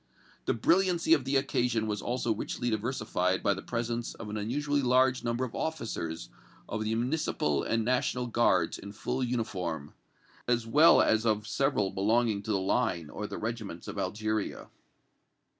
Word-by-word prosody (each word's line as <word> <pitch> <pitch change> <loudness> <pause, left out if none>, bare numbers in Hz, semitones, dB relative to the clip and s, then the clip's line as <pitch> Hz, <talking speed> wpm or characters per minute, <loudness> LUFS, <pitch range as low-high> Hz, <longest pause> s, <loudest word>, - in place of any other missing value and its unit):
The - - +1
brilliancy 170 - +3
of 140 -5 +2
the 135 +1 0
occasion 125 -4 +1
was 105 -2 -2
also 120 -1 0
richly 120 +2 -3
diversified 110 -5 -1
by 100 - +3
the 95 - -6
presence 120 0 -3
of 105 -2 -7
an - - -4
unusually 145 +7 0
large 130 0 +3
number 120 +2 0
of 125 - -9
officers 85 - -4 0.4
of 110 - -3
the 110 +1 -1
Municipal 120 - 0
and 115 0 0
National 125 0 0
Guards 115 -8 +2
in 100 0 -9
full 110 +4 -2
uniform, 95 - -3 0.5
as 120 -1 +1
well 150 +8 +6
as 110 0 +2
of 105 -2 +1
several 120 -5 +1
belonging 110 +1 +1
to 110 - -4
the 100 - +2
Line 95 -5 0
or 105 - -5
the - - -6
regiments 110 -6 -5
of - - -5
Algeria. 110 -1 -2
115 Hz, 160 wpm, -30 LUFS, 105-125 Hz, 0.5 s, well